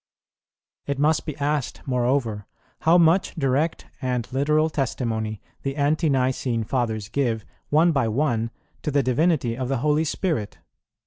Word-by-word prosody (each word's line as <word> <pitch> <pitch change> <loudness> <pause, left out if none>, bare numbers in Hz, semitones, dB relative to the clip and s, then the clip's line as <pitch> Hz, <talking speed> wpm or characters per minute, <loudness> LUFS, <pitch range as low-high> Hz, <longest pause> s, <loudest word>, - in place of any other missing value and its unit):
It 140 -1 -1
must 150 +3 +2
be 150 -2 -4
asked, 145 -2 -2
moreover, 125 -4 0 0.3
how 165 +2 +5
much 170 +2 +3
direct 145 +2 0 0.2
and 125 -3 -1
literal 150 +3 +2
testimony 115 -6 -2 0.2
the 135 0 -3
Ante 150 +3 +2
nicene 130 -3 0
Fathers 110 -3 -1
give, 115 -4 -1 0.2
one 160 +3 +4
by 135 -7 +1
one, 115 -1 0 0.3
to - - -2
the 140 -1 +2
divinity 130 -1 +1
of 130 0 -3
the 135 - +1
Holy 150 +1 +3
Spirit? 155 - -2
135 Hz, 140 wpm, -24 LUFS, 120-150 Hz, 0.3 s, how